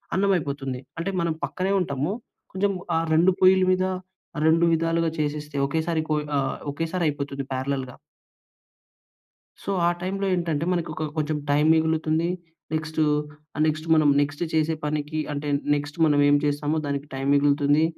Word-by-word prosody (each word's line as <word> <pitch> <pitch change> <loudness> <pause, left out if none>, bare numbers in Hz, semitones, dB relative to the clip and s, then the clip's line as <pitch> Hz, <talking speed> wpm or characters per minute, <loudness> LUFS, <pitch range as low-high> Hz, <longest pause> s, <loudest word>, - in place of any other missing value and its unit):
అన్నం 195 +1 +2
అయిపోతుంది. 140 -4 -4 0.2
అంటే 195 +4 -2
మనం 170 -1 0
పక్కనే 190 +1 -1
ఉంటాము. 145 +2 -1 0.4
కొంచెం 200 +2 +1 0.3
ఆ - - +3
2 170 +4 +5
పొయ్యల 185 0 +6
మీద, 185 0 +2 0.6
2 165 +1 +4
విధాలుగా 165 0 +1
చేసేస్తే, 150 0 -3
ఒకేసారి 160 +1 -1
కొయి 150 -1 0
ఆహ్, 135 -1 -2 0.2
ఒకేసారి 165 +4 -2
అయిపోతుంది 140 -1 -4
పారాలాల్‌గా. 130 -1 -3 1.7
సో, - - -4 0.2
ఆ - - +5
టైమ్‌లో 195 +2 -2
ఏంటంటే, 165 -3 -1
మనకు 170 -2 -1
ఒక - - -5
కొ - - -13
కొంచెం 150 0 0
టైమ్ 150 +2 +3
మిగులుతుంది. 160 +1 +1 0.5
నెక్స్ట్ 155 0 -3 0.6
ఆహ్, 155 - +1
నెక్స్ట్ 155 +1 -1
మనం 155 -2 +4
నెక్స్ట్ 145 +3 -2
చేసే 160 0 +2
పనికి 150 +1 -2
అంటే 145 0 -4 0.3
నెక్స్ట్ 145 +2 -4
మనం 145 -1 +3
ఏం 145 - +6
చేస్తామో 145 +2 0
దానికి 140 0 -3
టైమ్ 135 +1 -1
మిగులుతుంది. 145 +2 +3
155 Hz, 150 wpm, -25 LUFS, 145-165 Hz, 1.7 s, పొయ్యల